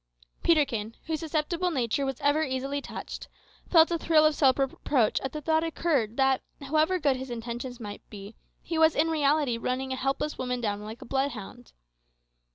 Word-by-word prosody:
Peterkin, 260 -9 +1
whose 320 -1 -2
susceptible 330 +3 -1
nature 270 -2 0
was 270 -2 -3
ever 290 +2 +3
easily 275 0 -2
touched, - - -7 0.4
felt 330 -1 +6
a 335 - 0
thrill 315 -2 +4
of 310 - +4
self 270 -3 +4
reproach 270 -3 +1
as 265 - -3
the 305 - -6
thought 315 +2 +2
suddenly 330 - -1
occurred 285 -9 0
that, 265 -1 +3 0.2
however 310 +6 +1
good 285 -6 +1
his 260 0 -6
intentions 240 +1 -5
might 205 -3 -7
be, 205 0 -9 0.3
he 330 -2 -2
was 320 0 +5
in 320 +2 +2
reality 290 -5 +2
running 260 +2 -2
a - - -2
helpless 270 +3 -2
woman 250 -1 -2
down 205 -3 -2
like 220 +2 -8
a - - -12
bloodhound. 245 -3 -3
270 Hz, 180 wpm, -28 LUFS, 245-310 Hz, 0.4 s, felt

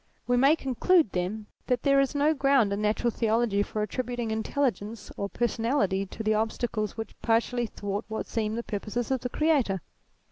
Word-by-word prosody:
We 245 - +2
may 275 +5 +5
conclude, 275 - +2
then, 190 +4 -2 0.2
that 250 -2 0
there 275 -1 +4
is 275 +1 +1
no 295 +2 +3
ground 275 -7 +3
in 200 - -2
Natural 215 +3 +1
Theology 225 -2 +1
for 210 +1 -2
attributing 240 +1 -3
intelligence 220 -2 -2
or 200 - -3
per 240 - 0
sonality 215 -5 0
to 220 - -6
the 215 0 +2
obstacles 220 0 -1
which 220 -2 -5
partially 235 +1 +1
thwart 205 0 -4
what 220 0 -4
seem 220 -1 -2
the 235 - -3
purposes 220 +4 -3
of 260 -2 +1
the 250 - -3
Creator. 275 -11 +2
230 Hz, 180 wpm, -27 LUFS, 210-255 Hz, 0.2 s, may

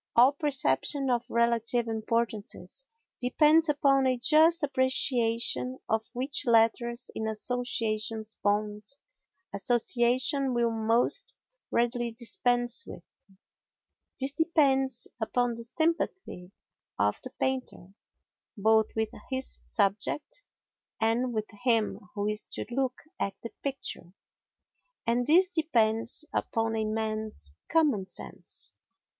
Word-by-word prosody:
All 245 +3 +7
perception 275 - 0
of 240 -1 -1
relative 235 0 +2
importances 225 - -3 0.3
depends 305 +6 +4
upon 275 -2 +3
a 255 -1 +1
just 315 +6 +4
appreciation 255 -2 +1
of 220 0 +1
which 265 +4 +1
letters 235 +1 +2
in 220 - -3
association's 220 -1 -1
bond 210 0 0 0.7
association 245 +5 +2
will 235 -1 +2
most 225 - +1 0.3
readily 240 0 0
dispense 245 - 0
with. - - -9 1.2
This 270 +1 +1
depends 275 -6 +2
upon 245 +2 0
the 230 0 -6
sympathy 315 - -2 0.5
of 105 +1 +1
the 255 - -5
painter 255 -8 -3 0.6
both 220 +1 +3
with 220 -1 0 0.2
his 260 -1 -2
subject 235 - -1 0.6
and 230 +3 +1
with 215 -2 -2 0.2
him 230 -4 +2 0.2
who 205 -1 -2
is 210 0 -2
to - - -4
look 260 0 -2 0.2
at 195 -1 -2
the 230 - -6
picture. 270 -10 -5 0.9
And 240 +2 +1
this 360 +4 +5
depends 240 -5 0
upon 225 0 -1
a 220 -1 0
man's 215 - -3 0.2
common 285 -13 +2
sense. - - -6
240 Hz, 105 wpm, -28 LUFS, 220-265 Hz, 1.2 s, All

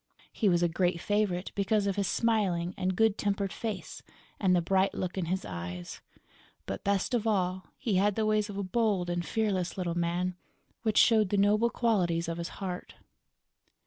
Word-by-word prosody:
He 215 - +2
was 175 -1 +3
a - - +4
great 175 +1 0
favorite 200 -2 0
because 205 +1 +1
of 200 -1 0
his 200 -2 0
smiling 190 -7 +1
and 185 -1 -1
good 220 +1 +2
tempered 200 -1 -1
face 220 -3 -5 0.4
and 185 -3 +3
the - - +4
bright 190 +3 +1
look 185 -1 -3
in 190 -3 -1
his 185 +3 -2
eyes; 90 +1 -6 0.6
but, - - -5
best 200 +3 0
of 230 -2 +1
all, 185 -3 0
he 210 -6 0
had 205 +1 +2
the 220 - 0
ways 215 0 +1
of 200 - -6
a 200 - -1
bold 190 -3 0
and 175 0 -1
fearless 195 -3 -1
little 175 -2 -1
man, 175 +1 -1 0.5
which 220 -2 0
showed 220 -4 +5
the 205 - +1
noble 210 +4 +4
qualities 180 -9 +1
of 165 0 -3
his 170 - -4
heart. 185 -2 -5
190 Hz, 185 wpm, -29 LUFS, 175-210 Hz, 0.6 s, showed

